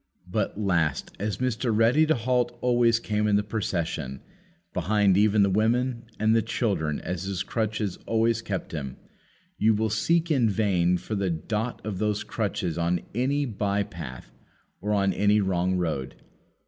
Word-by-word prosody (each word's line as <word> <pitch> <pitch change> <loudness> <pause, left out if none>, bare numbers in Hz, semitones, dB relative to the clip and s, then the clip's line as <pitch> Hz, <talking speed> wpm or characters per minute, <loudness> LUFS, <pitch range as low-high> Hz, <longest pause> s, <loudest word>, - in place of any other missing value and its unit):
But, 100 +1 -2
last 85 -8 0
as 105 +1 -2
Mr. 125 -1 -1
Ready 115 +8 +4
to 160 - +3
halt 120 0 0
always 120 -2 +3
came 105 -1 0
in 105 - +3
the 105 - +2
procession 85 - -3 0.5
behind 100 +2 +2
even 105 +1 +4
the 100 - +3
women 120 +4 +1
and 110 +1 +3
the 115 - +4
children 90 - -1
as 90 0 -4
his 95 -1 -2
crutches 110 -2 -2
always 115 0 +2
kept 100 -5 -4
him 70 -5 -5 0.6
you 110 0 +4
will 110 0 0
seek 165 +10 +1
in 125 -7 +3
vain 95 -4 +2
for 90 +5 -6
the 100 -2 0
dot 105 +10 -3
of 100 -4 -3
those 105 -1 0
crutches 100 -6 -2
on 85 +1 +1
any 135 +5 +1
by 100 -3 -1
path 65 -10 -9 0.5
or 105 +3 -2
on 100 -2 +2
any 105 +3 +3
wrong 95 -1 +1
road. 80 -7 -2
105 Hz, 160 wpm, -26 LUFS, 90-115 Hz, 0.6 s, Ready